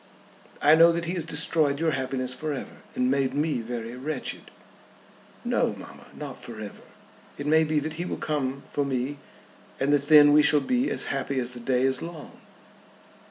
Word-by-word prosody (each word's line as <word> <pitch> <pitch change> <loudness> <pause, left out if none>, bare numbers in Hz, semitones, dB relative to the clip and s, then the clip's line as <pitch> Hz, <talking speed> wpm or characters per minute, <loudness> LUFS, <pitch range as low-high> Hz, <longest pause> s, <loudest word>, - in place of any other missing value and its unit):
"I 150 - +7
know 165 +1 +7
that 170 0 -2
he 170 - -2
has 170 -4 -2
destroyed 150 -2 +1
your 165 0 +1
happiness 130 -2 -2
for 155 +3 -3
ever, 135 - -7 0.2
and 125 0 +1
made 135 -1 0
me 150 -4 0
very 115 0 -6
wretched." 135 +1 -4 1.0
"No, - - +1
mamma; - - -11
not 140 -4 -7
for 115 -2 -8
ever. 105 -2 -8 0.6
It 140 - -6
may 160 +2 +4
be 155 0 0
that 155 +1 -4
he - - -2
will - - -4
come 140 -3 -2
for 145 - -1
me, 135 +1 -2 0.6
and 140 +2 +2
that 145 0 +1
then 145 -1 +8
we 150 - +7
shall 150 0 +4
be 250 - 0
as - - 0
happy 135 0 -2
as 125 0 -3
the 120 - -8
day 125 +1 0
is 130 -1 +1
long." 165 -3 -9
145 Hz, 190 wpm, -26 LUFS, 130-155 Hz, 1.0 s, then